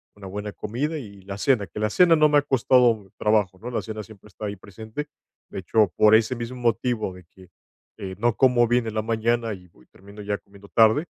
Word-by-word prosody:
una 100 -2 -10
buena 105 +2 -6
comida 145 +9 -3
y 100 -7 -10
la 100 0 -7
cena, 120 -4 +2
que 85 - -8
la 105 - +1
cena 170 - +5
no 155 -1 +4
me 145 - +4
ha - - +5
costado 120 -6 +2
trabajo, 105 -4 +1
¿no?, 120 +3 -7
la - - -1
cena 110 -1 -6
siempre 105 -1 -16
está 105 +3 -8
ahí 100 0 -4
presente. 110 +10 -8 0.4
De - - -6
hecho, 105 +3 +2
por 110 0 +6
ese 115 +3 +2
mismo 120 +2 -6
motivo 115 -4 -1
de 90 -2 -14
que, 95 +1 -19 0.5
eh, 95 -1 -6
no 115 +1 +1
como 125 -3 +4
bien 120 -1 +1
en 110 - -4
la 110 - +1
mañana, 115 0 0
y 90 -2 -12
voy 65 -6 -24
termino 100 +2 -14
ya 100 0 -2
comiendo 100 0 -17
tarde, 115 +8 +4
110 Hz, 225 wpm, -24 LUFS, 100-120 Hz, 0.5 s, por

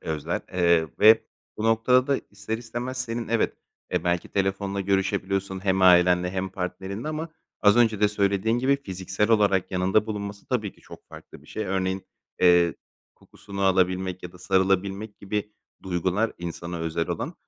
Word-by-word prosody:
özler, 80 -2 -3
eee, 85 -3 +3
ve 110 +1 +7 0.3
bu 110 - -4
noktada 115 +3 +3
da 140 -1 +1
ister 100 +2 -4
istemez, 120 +2 -5
senin, 115 -1 -4
evet, 115 0 +1 0.4
e, - - 0
belki 85 -1 0
telefonla 100 0 -1
görüşebiliyorsun 95 0 -1
hem 95 -1 +2
ailenle 90 0 +5
hem 95 0 -2
partnerinle 95 +6 -5
ama 155 +1 -4 0.3
az 105 +1 +6
önce 110 -4 +3
de 105 - +5
söylediğin 105 +2 +1
gibi 135 +3 +2
fiziksel 95 +1 -2
olarak 100 -4 +3
yanında 95 +3 +1
bulunması 100 -2 -6
tabii 110 -6 -2
ki - - -24
çok - - -14
farklı - - -13
bir - - -20
şey. 110 - -4
Örneğin, 95 0 -2 0.3
eee, 90 -2 +5 0.4
kokusunu 100 -1 -10
alabilmek 95 -1 +1
ya 90 - -8
da 90 - -15
sarılabilmek 95 +2 0
gibi 105 +1 -4 0.3
duygular 95 +4 0
insana 85 0 -5
özel 80 0 -2
olan, - - -3
95 Hz, 160 wpm, -25 LUFS, 90-110 Hz, 0.4 s, ve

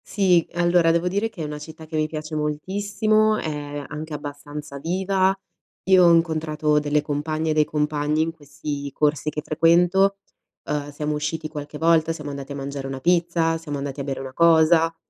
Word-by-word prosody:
Sì, 180 -4 +2
allora 175 -1 +3
devo 170 +2 +1
dire 200 +5 0
che 175 -7 -7
è - - -3
una 150 0 -5
città 160 +1 -10
che 160 +1 -8
mi 155 0 +1
piace 155 0 -6
moltissimo, 205 +8 +1
è 145 -3 -4
anche 155 +1 -7
abbastanza 145 0 -7
viva. 190 +4 +1 0.5
Io 190 -1 +6
ho 170 - +7
incontrato 155 -2 +1
delle 150 0 +1
compagne 155 +2 -2
e - - +3
dei 155 0 +4
compagni 150 0 -1
in 165 - 0
questi 145 -2 -6
corsi 150 +1 0
che 150 - -4
frequento. 175 +5 +3 0.5
Ehm, 145 -1 -3
siamo 150 +1 -3
usciti 150 +1 -3
qualche 150 -1 -7
volta, 165 0 +3
siamo 150 -2 -7
andati 140 0 -6
a - - -6
mangiare 140 0 -5
una 135 0 -5
pizza, 170 0 +2
siamo 150 -3 -5
andati 140 0 -5
a - - -3
bere 135 -1 -4
una 130 -1 -7
cosa, 165 0 +4
155 Hz, 185 wpm, -23 LUFS, 150-170 Hz, 0.5 s, ho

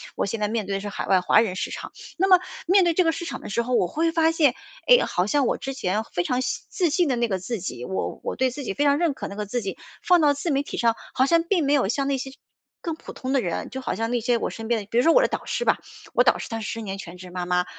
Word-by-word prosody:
我 - - 0
现 225 +3 -3
在 210 - +1
面 220 -1 -2
对 200 - -1
的 - - -1
是 205 - -5
海 - - -5
外 190 -1 +4
华 180 - +4
人 215 -5 +1
市 - - -3
场。 - - -7 0.3
那 380 +3 +2
么 370 -2 +7 0.3
面 380 +2 +6
对 345 -1 +3
这 365 - +3
个 325 - +3
市 330 +1 -5
场 275 -5 -5
的 - - -8
时 235 - 0
候， 250 +2 -3
我 185 - +3
会 330 - 0
发 325 0 +3
现， 305 -6 +3 0.3
诶， - - +7
好 180 - 0
像 275 +5 +2
我 - - 0
之 270 - -5
前 210 -4 -1
非 175 - 0
常 250 +8 0
信 255 0 -3
自 360 -4 +1
信 355 +1 +2
的 260 - +1
那 235 0 +1
个 190 -3 -1
自 220 +5 -4
己， 125 -9 -5
我 190 - -3
我 - - -3
对 260 -1 +1
自 280 +3 -6
己 215 - -3
非 290 - +1
常 285 0 +4
认 340 -4 +2
可 - - -5
那 200 - -8
个 210 0 -3
自 245 +4 -2
己， 195 - -4 0.3
放 355 -2 +5
到 295 -2 +5
自 310 +4 -2
媒 275 0 +2
体 285 - -6
上， 230 -1 +2 0.2
好 260 - +4
像 335 +4 +4
并 340 -2 +1
没 280 - +2
有 275 -8 +3
像 275 +6 0
那 280 -1 +1
些 265 +1 -5 0.5
更 330 -2 -3
普 - - -11
通 260 +1 -4
的 270 - +3
人， 175 -6 -3
就 265 - -6
好 260 - -2
像 225 +4 -2
那 240 -1 0
些 240 +1 +2
我 - - -2
身 225 0 -7
边 235 -2 +2
的 200 - -11
比 230 - -1
如 245 - +5
说 330 - +5
我 - - +6
的 - - +3
导 - - -4
师 485 - -2
吧， - - +3 0.4
我 - - +5
导 - - +4
师 - - -6
她 225 -1 -4
是 215 - -4
10 230 - -5
年 195 -2 -5
全 180 -2 -9
职 180 0 -10
妈 180 0 -4
妈， 180 0 +1
250 Hz, 345 characters per minute, -24 LUFS, 205-315 Hz, 0.5 s, 么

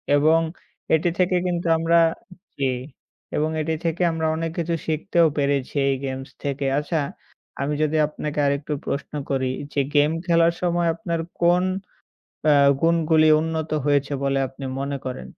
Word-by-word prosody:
এবং 155 +3 +4 0.5
এটি 160 +2 +3
থেকে 180 0 +3
কিন্তু 175 -1 -1
আমরা 165 +1 +3 0.6
জি, 140 - 0 0.7
এবং 155 +1 +1
এটি 160 +1 -1
থেকে 165 +2 -1
আমরা 160 -1 -1
অনেক 165 0 -2
কিছু 170 0 0
শিখতেও 165 +2 +2
পেরেছি 140 -1 0
এই 135 - +2
গেমস 135 0 -5
থেকে। 140 0 -2
আচ্ছা, 160 +3 -2 0.6
আমি 140 +2 -1
যদি 155 +1 0
আপনাকে 150 0 -5
আরেকটু 140 +1 -1
প্রশ্ন 140 - -4 0.2
করি, 130 -1 0 0.3
যে - - 0 0.2
গেম 145 +1 +4
খেলার 170 -1 +4
সময় 175 -1 +1
আপনার 170 -3 -3 0.2
কোন 175 +1 +4 0.8
অ্যা 150 - +6 0.3
গুণগুলি 165 -1 +4
উন্নত 160 0 -2 0.2
হয়েছে 145 0 +1
বলে 135 0 +1
আপনি 135 +1 -11 0.2
মনে 140 +1 -2
করেন? 125 - -6
155 Hz, 150 wpm, -23 LUFS, 140-170 Hz, 0.8 s, অ্যা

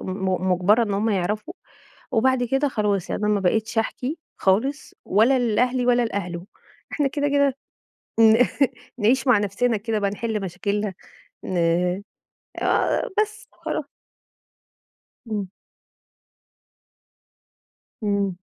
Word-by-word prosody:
م 185 -1 -1
مجبرة 200 +6 +4
إن 205 -3 -1
هم 215 +3 +1
يعرفوا. 210 - -2 0.6
وبعد 255 +1 +3
كده 270 +4 +1
خلاص. 205 -6 -1
يعني - - -2
أنا 210 - +2
ما 200 - 0
بقيتش 220 +4 0
احكي 260 +7 -2 0.2
خالص 240 +10 0
ولا 230 +7 +4
لأهلي 245 +2 +1
،ولا 245 -1 +4
لأهله. 180 -4 -4 0.5
إحنا 290 -3 +1
كده، 290 +1 -1
كده 280 -2 +2 0.6
ن 225 +2 +7 0.5
نعيش 250 +5 +2
مع 250 -4 +6
نفسنا 210 +4 0
كده 220 +1 -2
بقى 200 - +1
نحل 215 +1 -3
مشاكلنا 200 +2 -2 0.5
ن 185 - -3 1.1
آه - - +1
بس 430 0 -7
وخلا - - -4 1.5
إمم. 205 -2 -2 2.6
إمم. 200 -3 0
220 Hz, 115 wpm, -23 LUFS, 200-250 Hz, 2.6 s, ن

